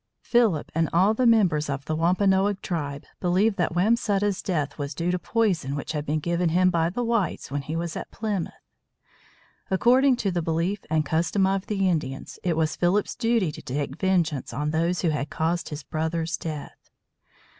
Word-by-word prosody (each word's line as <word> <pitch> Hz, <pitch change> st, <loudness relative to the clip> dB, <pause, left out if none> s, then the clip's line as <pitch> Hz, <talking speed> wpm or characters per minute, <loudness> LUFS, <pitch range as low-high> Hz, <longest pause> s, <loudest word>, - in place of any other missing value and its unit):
Philip 225 Hz, -11 st, +2 dB
and 165 Hz, -1 st, +1 dB
all 190 Hz, +5 st, +4 dB
the 245 Hz, +2 st, +2 dB
members 180 Hz, -10 st, +3 dB
of 140 Hz, 0 st, -3 dB
the 155 Hz, -, -1 dB
Wampanoag 190 Hz, +4 st, +2 dB
tribe 145 Hz, -5 st, -3 dB, 0.2 s
believed 195 Hz, +4 st, +2 dB
that 175 Hz, -2 st, 0 dB
Wamsutta's 205 Hz, 0 st, +1 dB
death 150 Hz, -6 st, -2 dB
was 140 Hz, 0 st, -4 dB
due 170 Hz, +3 st, 0 dB
to 180 Hz, -, -1 dB
poison 180 Hz, -, 0 dB
which 145 Hz, -, -4 dB
had 150 Hz, -1 st, -4 dB
been 150 Hz, +2 st, +1 dB
given 170 Hz, +2 st, 0 dB
him 185 Hz, +2 st, +3 dB
by 165 Hz, -1 st, +1 dB
the 245 Hz, +7 st, -3 dB
whites 230 Hz, -, -1 dB
when 145 Hz, 0 st, -1 dB
he 150 Hz, +3 st, -5 dB
was 170 Hz, -1 st, -3 dB
at -, -, -6 dB
Plymouth. 210 Hz, -6 st, -4 dB, 1.0 s
According 250 Hz, +7 st, +4 dB
to 205 Hz, -5 st, -1 dB
the 175 Hz, -1 st, -1 dB
belief 170 Hz, +5 st, -1 dB
and 155 Hz, -1 st, +1 dB
custom 170 Hz, +6 st, +1 dB
of 195 Hz, 0 st, 0 dB
the 195 Hz, -2 st, +1 dB
Indians, 150 Hz, -7 st, -3 dB
it 170 Hz, -3 st, 0 dB
was 160 Hz, -1 st, +1 dB
Philip's 185 Hz, +4 st, +1 dB
duty 230 Hz, -8 st, +1 dB
to -, -, -10 dB
take 140 Hz, +3 st, -4 dB
vengeance 170 Hz, -8 st, 0 dB
on 150 Hz, +5 st, -2 dB
those 170 Hz, +3 st, 0 dB
who 170 Hz, -, +3 dB
had 145 Hz, -2 st, -2 dB
caused 165 Hz, +2 st, -1 dB
his 150 Hz, -1 st, -6 dB
brother's 160 Hz, +1 st, -2 dB
death. 155 Hz, -3 st, -7 dB
170 Hz, 185 wpm, -25 LUFS, 155-195 Hz, 1.0 s, all